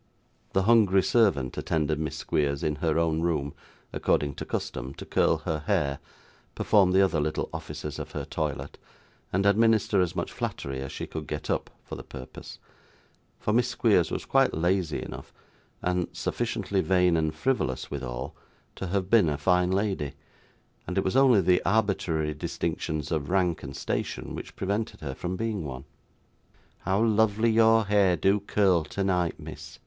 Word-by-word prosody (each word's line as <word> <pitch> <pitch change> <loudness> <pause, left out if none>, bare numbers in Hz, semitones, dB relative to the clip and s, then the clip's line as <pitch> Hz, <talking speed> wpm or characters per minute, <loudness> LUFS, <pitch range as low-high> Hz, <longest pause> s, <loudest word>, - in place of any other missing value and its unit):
The 95 - +2
hungry 100 -4 +5
servant 95 - +2
attended 75 -1 0
Miss 80 0 -3
Squeers 70 -2 -1
in 75 -1 0
her 80 0 0
own 80 -1 +1
room 75 -4 -1 0.4
according 70 -1 +1
to - - -5
custom, 65 +1 -4
to - - -8
curl - - +2
her 80 - -1
hair, 70 -1 +1 0.6
perform 100 -3 +4
the 95 +1 +5
other 90 -5 +1
little 75 +1 -2
offices - - -6
of - - -7
her - - -4
toilet, 70 -2 -4 0.5
and 95 +2 +1
administer 110 -1 +4
as 90 0 -1
much - - -3
flattery 70 -1 -4
as 70 - -5
she - - -5
could 80 -2 -7
get 75 -1 -3
up, - - -1
for - - -11
the - - -7
purpose; 65 0 -10 0.8
for 105 - -1
Miss 120 +1 +3
Squeers 105 -8 +2
was - - -4
quite - - +3
lazy 85 0 0
enough - - -9 0.5
(and 90 -1 0
sufficiently 100 -1 -1
vain 90 -2 +3
and 80 -1 0
frivolous 125 - -1
withal) - - -5 0.4
to 95 - -4
have 95 +1 -1
been 100 -5 +5
a 75 - -1
fine 90 +1 +2
lady; 95 -7 -1 0.7
and 90 - -3
it 95 - +3
was 95 - -1
only 130 -6 +6
the 90 0 +3
arbitrary 95 -7 +1
distinctions 75 +1 -3
of 75 -4 -1
rank 90 -3 +1
and 70 -1 -8
station - - -3
which - - -8
prevented 100 +1 -2
her 70 -4 -4
from 90 +7 -4
being 110 -2 -2
one. 65 -2 -7 0.9
'How 95 +4 +1
lovely 110 0 +3
your 115 0 +5
hair 100 -3 +3
do 100 +2 +3
curl 95 -4 +2
tonight, 90 0 -1
miss! - - -9
90 Hz, 165 wpm, -27 LUFS, 75-100 Hz, 0.9 s, only